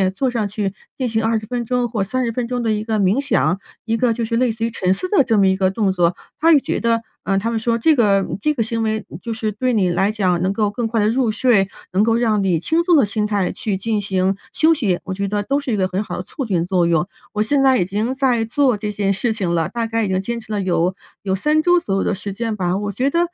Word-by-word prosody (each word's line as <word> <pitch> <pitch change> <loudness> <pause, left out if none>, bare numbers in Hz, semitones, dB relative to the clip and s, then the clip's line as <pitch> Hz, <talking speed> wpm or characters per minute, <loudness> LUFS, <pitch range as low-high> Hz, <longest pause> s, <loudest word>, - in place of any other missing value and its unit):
坐 265 +3 0
上 225 -4 -1
去， 200 -1 -3 0.2
进 255 - -1
行 225 -1 -1
20 220 -1 0
分 240 0 -3
钟 245 +1 0
或 215 -4 -1
30 240 +3 -1
分 240 +1 -3
钟 245 0 -2
的 225 -2 0
一 210 0 -1
个 220 -1 -1
冥 195 +6 +2
想， 270 -8 +1 0.3
一 225 0 0
个 240 -1 +2
就 235 +1 -3
是 230 +1 -1
类 250 -1 +2
似 225 0 -5
于 - - -1
沉 185 -5 0
思 365 - -4
的 385 -8 +4
这 225 -4 +1
么 195 - +4
一 190 - +3
个 190 -1 +2
动 200 -1 +1
作。 175 -1 +1 0.2
她 330 +1 +5
也 295 - +6
觉 - - -2
得 230 -1 +1 0.2
呃， 195 - 0
她 225 +4 -2
们 230 - -1
说 230 +1 0
这 310 +7 +3
个 200 -6 +3 0.2
这 300 - +1
个 245 - -2
行 230 +1 -2
为 220 -1 -1 0.2
就 230 - -4
是 220 -1 -2
对 250 +5 -1
你 195 -5 +2
来 190 +4 +1
讲 185 -5 +1
能 190 - +1
够 210 0 +1
更 225 +2 -2
快 225 0 -1
地 210 - +3
入 235 -1 +1
睡， 220 -4 +3 0.3
能 195 - +3
够 225 +1 +2
让 220 -4 +1
你 190 - +1
以 165 - +2
轻 320 - +1
松 345 -1 +4
的 285 - +5
心 210 +1 -1
态 205 -3 0
去 210 -3 -3
进 215 +2 -1
行 190 -1 0 0.2
休 320 +1 +4
息， 205 - 0
我 190 - -4
觉 200 +1 -2
得 205 +1 -1
都 275 +7 0
是 280 -3 -4
一 - - +2
个 190 -2 +1
很 190 +3 -2
好 - - -6
的 180 - -4
促 270 +7 -5
进 180 -6 0
作 180 -2 +2
用。 170 0 +1 0.3
我 210 - 0
现 280 +5 +1
在 265 -1 +5
已 180 - +1
经 210 +7 -1
在 255 -4 +1
做 250 0 +2
这 210 0 -3
件 200 -1 0
事 220 +4 0
情 190 -6 -2
了， 165 -2 +1
大 230 -1 -2
概 225 0 -1
已 - - -2
经 190 0 0
坚 235 +4 -3
持 220 - -12
了 205 -1 -1
有 180 -1 0 0.3
有 190 -2 -1
3 300 +11 +2
周 355 +1 +4
左 195 - -2
右 195 - +1
的 - - 0
时 200 +1 -5
间 225 +2 -3
吧， 180 -1 -1
我 205 0 -3
觉 255 +7 0
得 335 - 0
220 Hz, 305 characters per minute, -20 LUFS, 195-240 Hz, 0.3 s, 也